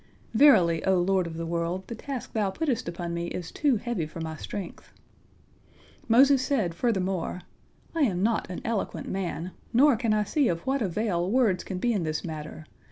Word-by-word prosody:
Verily, 185 - +5
O 190 -1 +3
Lord 185 0 +2
of 160 -1 -7
the 165 - -3
world, 170 +3 -2
the - - -5
task 260 +2 -6
Thou 210 -3 +1
puttest 260 - -2
upon 170 0 -4
me 170 0 -2
is 175 -1 -5
too 285 -5 +2
heavy 215 -8 -3
for 160 - -9
my 160 -1 -4
strength." 190 +3 -7 1.2
Moses 265 +3 +6
said 255 -10 0
furthermore: 190 -3 -1 0.5
"I 330 - -1
am 190 -9 +2
not 225 -3 +1
an 180 - -5
eloquent 225 -3 -2
man, 185 -2 -3 0.2
nor 270 +3 +6
can 230 -1 0
I 215 0 +3
see 280 +5 +1
of 170 -1 -1
what 270 0 0
avail 185 -3 0
words 225 -5 +2
can 190 - -5
be 240 +5 +1
in 200 - 0
this 155 -1 -2
matter. 155 -1 -7
190 Hz, 185 wpm, -27 LUFS, 170-235 Hz, 1.2 s, Moses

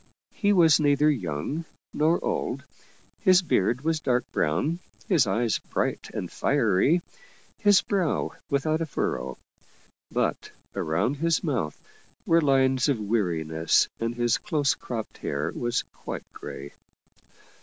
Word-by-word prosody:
He 205 -2 +1
was 165 -6 +6
neither 145 0 +4
young 105 - -3 0.3
nor 160 +3 +2
old, - - -2 0.6
his 185 -2 +5
beard 120 - +1
was 160 +1 0
dark 125 -4 +1
brown, 145 - 0 0.3
his 165 -9 +3
eyes 115 -1 +1
bright - - -3
and - - -5
fiery, 140 - +2 0.6
his 205 -3 +5
brow 190 -6 0 0.2
without 155 +3 +1
a 165 - -1
furrow. 140 - -2 0.7
But - - -1 0.3
around 85 - 0
his 165 +4 +1
mouth 120 - -2 0.5
were 165 0 +4
lines 135 -2 +3
of 135 -5 +1
weariness 85 -7 +1
and 115 +1 -2
his 120 -1 +1
close 150 -8 +1
cropped 115 -3 -6
hair 70 +1 -2
was 120 -1 -1
quite - - -7
gray. 70 +1 -8
140 Hz, 125 wpm, -26 LUFS, 110-160 Hz, 0.7 s, was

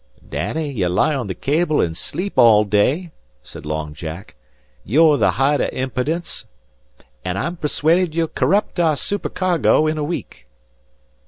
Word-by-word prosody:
"Danny, 155 -2 -3
ye 100 -9 -1
lie 90 - +2
on 130 -6 -3
the 95 - -4
cable 150 - 0
an' 80 - +1
sleep 185 - -4
all 110 -3 +6
day," 125 - +1 0.3
said - - -11
Long 75 -1 -3
Jack. 80 +6 -8 0.5
"You're 150 - +4
the 110 - +2
hoight 140 +4 +2
av - - 0
impidence, 135 +6 -3 0.8
an' 90 +1 -3
I'm 170 - -2
persuaded 165 +2 +1
ye'll 165 -1 +1
corrupt 200 +3 0
our 160 -3 +3
supercargo 185 -5 +1
in 155 0 -1
a - - -1
week." 145 - -6
145 Hz, 150 wpm, -20 LUFS, 105-165 Hz, 0.8 s, all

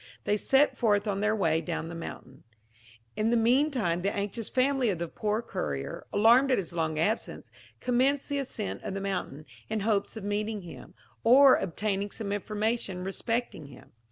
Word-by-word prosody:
They 205 - +1
set 270 +7 +3
forth 210 -3 +2
on 200 -1 -1
their 215 +1 +1
way 160 -6 +1
down 160 0 -4
the 170 - -7
mountain. 135 -5 -9 0.7
In 215 +1 +1
the 240 - +3
mean 250 +7 +3
time 180 - -1
the 195 +2 0
anxious 205 +2 -3
family 265 -1 +2
of 190 - -1
the 170 +1 -3
poor 215 +6 -2
courier, 70 - -4
alarmed 235 +6 +5
at 255 - +3
his 175 -3 -4
long 160 -2 -1
absence, 205 +9 -2 0.3
commenced 260 +3 +1
the 285 -1 -1
ascent 235 -6 -4
of 195 - -5
the - - -2
mountain, 185 -7 -4 0.2
in 215 - -1
hopes 210 +1 0
of 215 - -7
meeting 210 0 -2
him, 175 +1 -11 0.3
or 265 +3 +8
obtaining 200 +2 -2
some 200 -1 -5
information 210 -2 -2
respecting 210 - -3
him. 140 - -15
210 Hz, 180 wpm, -28 LUFS, 185-235 Hz, 0.7 s, or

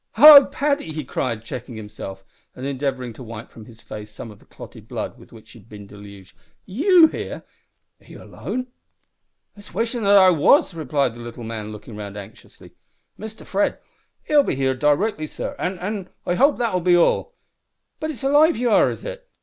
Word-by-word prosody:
"Hallo, 295 -2 +10
Paddy!" 280 - -2
he 155 0 -5
cried, 115 -3 -3
checking 120 0 -7
himself, 100 -2 -9 0.3
and 130 - -7
endeavouring 130 -3 -3
to 120 - -13
wipe 115 -2 -9
from 110 - -13
his 115 0 -15
face 105 0 -9
some 105 +1 -10
of 105 - -16
the - - -23
clotted - - -13
blood - - -6
with - - -17
which - - -15
he - - -14
had - - -22
been 105 -1 -11
deluged. 100 -1 -14 0.3
"You 325 - +5
here? 320 - -4 0.6
Are - - -24
you - - -12
alone?" 255 +1 -5 0.9
"It's 205 -4 -15
wishin' 230 +3 -1
that 200 0 +6
I 190 -1 +7
was," 185 - +4
replied 140 -5 -1
the 120 - -13
little 120 0 -9
man, 110 -2 -6
looking 105 +1 -10
round 105 -1 -8
anxiously. 100 +2 -13 0.4
"Mister 220 +1 -10
Fred 200 +1 0 0.5
'll 300 -1 +5
be 275 - -2
here 130 0 0
d'rectly, 155 +5 0
sor - - -6
an' 185 +1 -2
an' 190 +1 -5 0.2
I - - 0
hope 280 +10 +3
that'll 225 -7 0
be 175 0 +4
all. 470 - +1 0.6
But 310 - -3
it's 280 -3 -7
alive 295 +4 +4
ye 245 - -2
are, 225 -4 +4
is - - -7
it? - - -8
155 Hz, 190 wpm, -22 LUFS, -, 0.9 s, Hallo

